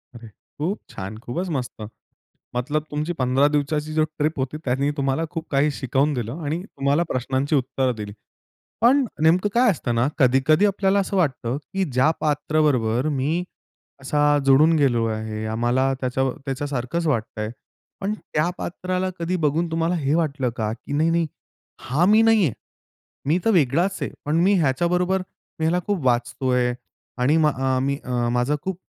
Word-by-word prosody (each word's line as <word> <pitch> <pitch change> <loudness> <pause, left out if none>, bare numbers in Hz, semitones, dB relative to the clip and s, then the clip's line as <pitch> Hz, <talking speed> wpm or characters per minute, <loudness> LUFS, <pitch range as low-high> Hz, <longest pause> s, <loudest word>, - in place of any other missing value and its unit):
अरे! 115 -1 -10 0.3
खूप 180 +8 -1
छान. 95 +3 -7
खूपच 120 +11 -4
मस्त. 120 -4 -6 0.7
मतलब 145 +5 -1
तुमची 150 +3 -2
15 135 -1 +2
दिवसाची 150 +1 -1
जी 155 0 +3 0.2
ट्रिप 155 +1 0
होती 130 +3 -2
त्यानी 135 +3 +1
तुम्हाला 140 +3 0
खूप 165 -1 -5
काही 145 +2 +3
शिकवून 140 +2 0
दिलं 125 +5 -4
आणि 155 +4 -2
तुम्हाला 140 -3 0
प्रश्नांची 135 +4 0
उत्तरं 130 -1 0
दिली. 105 -2 -6 0.7
पण 260 +5 +5 0.2
नेमकं 175 +5 +4
काय 245 0 +5
असतं 140 -9 -2
ना 115 +2 +2
कधी-कधी 135 +7 +4
आपल्याला 195 0 +2
असं 195 0 -2
वाटतं, 135 -8 0
की 190 +7 -3
ज्या 130 +4 +3
पात्र 150 +1 0
बरोबर 125 -2 +1
मी 150 +5 0 0.6
असा 140 +2 -1 0.3
जुडून 145 +4 +6
गेलो 125 -6 +2
आहे. 110 0 -3
आम्हाला 120 +4 +1
त्याच्या 130 +1 0 0.2
त्याच्यासारखंच 135 +3 -2
वाटतंय. 110 -5 -1 0.5
पण 200 +2 -1
त्या 155 -6 -2
पात्राला 185 +1 -2
कधी 170 +2 -1
बघून 160 +3 +1
तुम्हाला 165 +2 0
हे 145 -2 0
वाटलं 145 -6 0
का, 110 -1 -1
की 120 +4 -9
नाही, 155 +3 +2
नाही 165 0 +2 0.5
हा 140 +8 +1
मी 215 +3 +6
नाही 225 -2 +5
आहे. - - -1 0.8
मी 160 +4 +3
तर 225 - +3
वेगळाच 170 +4 +2
आहे, - - -2
पण 150 +2 0
मी 195 +3 +4
ह्याच्याबरोबर 175 +6 +1 0.4
मी 160 - -1
ह्याला 170 +3 +2
खूप 200 -8 -1
वाचतोय 125 +1 +1 0.4
आणि 130 +5 +3
म 160 -1 +4 0.4
मी 140 +1 -1
अ, 120 -1 -1
माझा 125 +4 +1
खूप 190 -2 -4
145 Hz, 160 wpm, -23 LUFS, 125-170 Hz, 0.8 s, जुडून